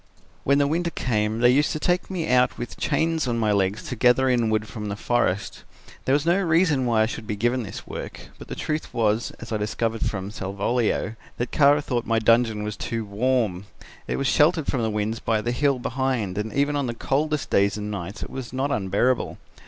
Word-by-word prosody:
"When 140 +1 +3
the 145 - +3
winter 170 +4 0
came 110 -6 -1
they 120 0 +6
used 145 +3 +3
to 155 - -3
take 180 +3 0
me 180 -4 -2
out 125 0 +3
with 120 - -6
chains 160 -3 0
on 120 -1 0
my 110 -2 +1
legs 100 0 +1
to 125 - -5
gather 125 +3 +4
in 120 -3 +2
wood 110 0 0
from 105 -1 -6
the 100 - -3
forest. 100 -3 -1 0.4
There 130 - +2
was 145 +2 +2
no 175 +4 +3
reason 160 -6 +2
why 110 -2 +3
I - - +3
should 110 -1 -6
be 105 - -2
given 120 +4 +1
this 100 -4 -7
work, - - -8
but - - -10
the - - -5
truth 155 0 -3
was, 110 0 +1
as 115 - -9
I 110 - +1
discovered 110 +2 -2
from 100 0 -3
Salvolio, 110 +3 -1 0.2
that 120 - -3
Kara 145 0 +4
thought 120 -4 -2
my 115 - +2
dungeon 115 -1 +3
was 105 -1 -4
too 115 -1 -3
warm. 105 -3 0 0.4
It - - -1
was 140 - -2
sheltered 155 +3 +3
from 130 - -1
the 110 - 0
winds 105 +1 -2
by 110 -1 0
the 120 +3 -2
hill 140 +2 +2
behind 125 -6 -1
and 105 +2 -3
even 145 +3 +1
on 140 -3 0
the 120 - -3
coldest 150 +4 -1
days 100 +1 +3
and 105 0 -4
nights 100 +1 -5
it - - -7
was 130 -2 -6
not 135 +3 -1
unbearable. 105 +5 0
120 Hz, 220 wpm, -24 LUFS, 105-140 Hz, 0.4 s, they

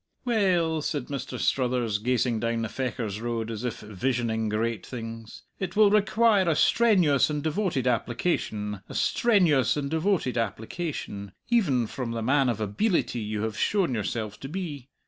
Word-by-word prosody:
"We 245 - 0
ell," 175 -7 +2
said 145 -4 -3
Mr. 140 -2 -4
Struthers, 125 -5 +1
gazing 120 0 +1
down 115 0 -1
the 115 - -3
Fechars 115 -5 -3
Road, 115 -1 -2
as 110 +1 -5
if 125 -3 -3
visioning 110 +1 -1
great 110 0 -1
things, 115 -2 -8 0.2
"it 190 0 -4
will 210 -1 +6
require 210 -2 +3
a 160 - +2
strenuous 180 - +4
and 150 -1 -2
devoted 160 - 0
application 115 - -1
a - - -8
strenuous 170 - +3
and 140 -1 -3
devoted 160 - +1
application 110 - -4 0.2
even 160 - +2
from 115 +1 -4
the 115 -1 -3
man 135 +2 +3
of 115 - -1
abeelity 120 - 0
you 105 0 -3
have 110 -1 -2
shown 190 - +1
yourself 110 -1 -3
to 135 - -7
be. 150 -7 -5
125 Hz, 160 wpm, -27 LUFS, 115-170 Hz, 0.2 s, will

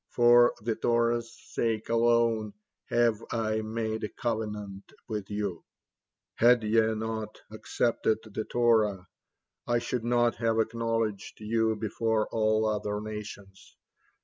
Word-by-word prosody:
For 120 0 +5
the 115 +1 -1
Torah's 120 0 +1
sake 110 -2 -3
alone 115 -2 +2 0.3
have 115 -2 +2
I 110 -1 0
made 110 0 -3
a 105 - -2
covenant 105 -4 -4 0.2
with 105 -3 -4
you; 100 -4 -3 0.7
had 120 0 +4
ye 110 +1 +3
not 110 0 -4
accepted 110 0 0
the 110 0 -5
Torah, 110 -6 +2 0.6
I 120 0 +2
should 120 0 -3
not 120 0 +2
have 115 -1 +1
acknowledged 115 -2 -2
you 110 +1 0
before 110 +1 -1
all 110 0 +2
other 105 -1 -1
nations. 105 -2 -9
110 Hz, 120 wpm, -28 LUFS, 105-115 Hz, 0.7 s, For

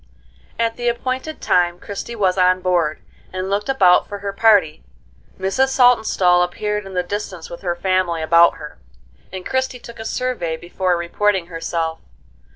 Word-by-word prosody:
At 230 0 -1
the 240 0 0
appointed 255 +5 -4
time 175 -1 +2
Christie 205 +5 -7
was 190 -4 +1
on 185 0 +3
board, 170 -4 0 0.3
and 185 +1 -4
looked 205 +4 -1
about 190 -10 +4
for 205 - -5
her 200 0 -5
party. 200 -7 +3 0.6
Mrs. 195 +8 +1
Saltonstall 220 -9 +3
appeared 210 +3 -2
in 190 - -9
the 180 - +1
distance 180 -3 -6
with 170 - -8
her 175 -2 -2
family 180 -2 0
about 170 +2 +5
her, 150 -1 -10 0.5
and 185 -1 -7
Christie 260 -1 -1
took 235 -1 -12
a 220 - -6
survey 230 -11 -2
before 175 +1 -1
reporting 190 +2 0
herself. 165 0 -3
190 Hz, 160 wpm, -20 LUFS, 175-220 Hz, 0.6 s, about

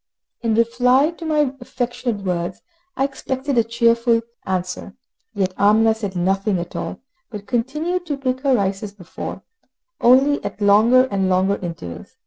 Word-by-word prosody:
In 230 -2 +1
reply 250 +6 +3
to 335 0 -10
my 300 -4 +1
affectionate 245 -4 -3
words, 175 -2 -3 0.3
I 270 - +2
expected 270 0 -2
a - - +4
cheerful 230 0 +2 0.2
answer; 185 +1 -3 0.4
yet 190 -2 0
Amina 220 +2 +5
said 205 -4 -5
nothing 195 +3 +1
at 175 0 -6
all, 170 - -5 0.3
but 210 -3 -8
continued 305 +10 -2
to 290 -3 -2
pick 260 -2 -1
her 270 -1 +2
rice 195 -3 0
as 205 -2 -6
before, 180 -4 -8 0.6
only 270 +4 +4
at 205 0 -5
longer 220 +6 +5
and 195 -1 +1
longer 190 +2 +2
intervals. 90 - -8
230 Hz, 150 wpm, -21 LUFS, 195-260 Hz, 0.6 s, Amina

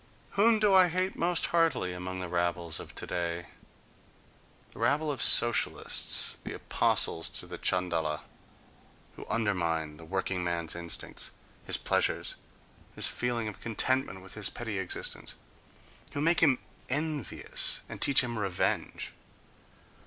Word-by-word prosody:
Whom 220 +3 +4
do 210 -2 +3
I 185 -1 +7
hate 185 +2 -1
most 175 0 +2
heartily 160 - +2
among 90 +1 -5
the 90 - -4
rabbles 85 -1 -1
of - - -10
today? 85 -1 -3 1.3
The - - -13
rabble 150 +1 +1
of 140 - -4
Socialists, 120 -1 +3
the - - -5
apostles 80 - +2
to - - -6
the - - -8
Chandala, 80 -4 0 0.9
who - - -10
undermine 85 -8 -1
the 85 - -12
workingman's 85 -2 -2
instincts, 85 -1 -3 0.3
his - - +7
pleasure, - - +1 0.7
his - - +3
feeling 120 -2 -2
of 105 - -7
contentment 120 -3 -1
with 95 - -10
his 110 -2 +1
petty 110 -5 -4
existence—who 95 +8 -7
make 165 +3 +4
him 140 -6 +5 0.3
envious 150 +2 0
and - - -9
teach 140 - +6
him 120 -3 -3
revenge.... 95 -4 -1
105 Hz, 125 wpm, -30 LUFS, 85-145 Hz, 1.3 s, I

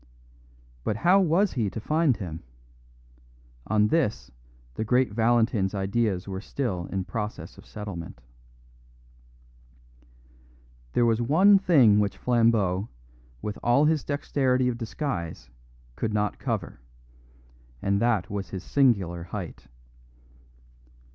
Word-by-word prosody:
But 105 - -1
how 180 - +4
was 185 +2 +2
he 115 -6 0
to 110 - -6
find 155 +2 +1
him? 85 -5 -6 1.3
On 105 0 +2
this 105 - 0 0.4
the 110 - -3
great 125 +1 +2
Valentin's 110 -3 +2
ideas 100 -1 -1
were 95 -1 -5
still 105 -8 -3
in 95 -1 -3
process 105 +3 -5
of - - -15
settlement. 100 - -7 2.7
There 120 - +3
was 115 0 +2
one 190 - +5
thing 135 - +5
which 100 -2 -1
Flambeau, 115 -5 +1 0.5
with 105 -1 -4
all 120 +5 +3
his 155 -1 +2
dexterity 130 -3 0
of 120 - -3
disguise, 105 - -4 0.4
could 110 -1 -2
not 105 -1 -1
cover, - - -3 1.0
and 100 +5 0
that 115 -6 +1
was 100 -1 -5
his 95 -1 -6
singular 100 -11 +1
height. 90 -2 -7
110 Hz, 115 wpm, -26 LUFS, 95-130 Hz, 2.7 s, one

